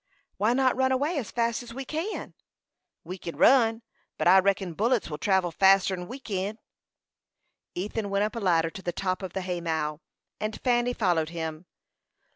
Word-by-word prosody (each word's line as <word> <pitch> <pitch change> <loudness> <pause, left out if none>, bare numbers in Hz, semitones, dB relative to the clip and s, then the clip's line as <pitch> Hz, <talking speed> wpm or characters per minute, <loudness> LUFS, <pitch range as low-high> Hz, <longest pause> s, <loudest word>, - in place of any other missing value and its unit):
"Why 215 +3 +2
not 260 0 +2
run 260 0 +2
away 285 +5 +1
as 240 - -5
fast 235 0 0
as 235 -1 -10
we 270 0 -5
can?" 325 +10 -4 0.7
"We 185 +3 -7
kin 170 - -6
run, 230 -3 +4 0.3
but - - 0
I 190 +2 +8
reckon 190 -2 0
bullets 225 0 0
will 150 - -5
travel 190 -2 +2
faster 195 +2 +4
'n 180 -1 -5
we 250 - -7
kin." 205 -3 -3 1.2
Ethan 205 +3 -3
went 200 +1 +1
up 215 +3 -2
a - - -2
ladder 165 -5 +2
to 190 - -9
the 175 - -2
top 185 +2 -2
of 190 -2 -6
the 190 - -2
hay 180 -1 -3
mow, 160 -2 -2 0.4
and 215 0 -3
Fanny 245 -1 +2
followed 175 -8 +1
him. 165 0 -5
195 Hz, 185 wpm, -27 LUFS, 175-235 Hz, 1.2 s, I